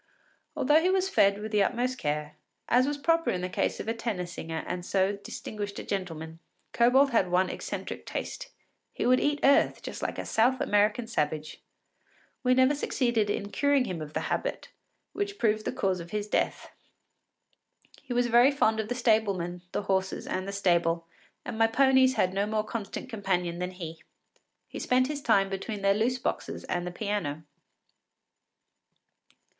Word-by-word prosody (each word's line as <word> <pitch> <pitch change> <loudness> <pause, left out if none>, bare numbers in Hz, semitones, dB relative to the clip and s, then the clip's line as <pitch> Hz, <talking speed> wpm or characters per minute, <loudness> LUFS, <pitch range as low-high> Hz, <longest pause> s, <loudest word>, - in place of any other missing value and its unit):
Although 295 +4 +4
he 360 - +2
was 380 0 +2
fed 200 - +4
with 215 +1 -6
the 210 -2 +3
utmost 250 +4 0
care, 150 0 -2 0.3
as 250 +2 +4
was 290 0 -1
proper 330 +3 +2
in 180 - -1
the 180 - -2
case - - -1
of - - -5
a 225 - +1
tenor 230 -6 -3
singer 165 -2 -5
and 180 0 -4
so 190 +2 +1
distinguished 205 0 -6
a - - -5
gentleman, 165 -4 -5 0.3
Kobold 265 +4 +4
had 195 -6 +2
one 180 +1 +2
eccentric - - -6
taste: - - -5 0.4
he - - -2
would 255 +1 +5
eat 290 0 +1
earth 275 +1 +4
just - - -6
like - - -3
a - - -4
South 245 +4 +2
American 210 +3 +2
savage. 155 -8 -2 0.8
We 255 -1 +3
never 260 +2 +5
succeeded 240 -6 0
in 205 0 -2
curing 285 -2 +2
him 175 -7 -4
of 155 0 -7
the - - -1
habit, - - -3 0.4
which 405 0 -3
proved 215 -1 +1
the - - 0
cause 190 -2 -1
of 170 0 -8
his 210 +1 -3
death. - - -1 1.3
He - - -11
was 245 0 +2
very 240 +2 +6
fond 220 -6 +2
of 220 - -2
the 245 - -1
stablemen, 200 -7 +1
the - - -2
horses, 190 -1 -1
and 185 +1 -3
the - - -3
stable, 170 -4 +1 0.4
and 230 -2 -5
my 225 - +6
ponies 260 +2 +4
had 185 -4 +1
no 200 +2 0
more 215 0 0
constant 215 +1 -5
companion 180 -7 -2
than 180 0 -2
he. 170 -3 -8 0.7
He - - -7
spent 255 0 +2
his 295 -1 -3
time 200 -6 +3
between 195 +1 -5
their 195 0 +5
loose 230 +5 +1
boxes - - -3
and 175 0 -2
the - - -4
piano. 175 -6 -3
210 Hz, 175 wpm, -28 LUFS, 180-250 Hz, 1.3 s, very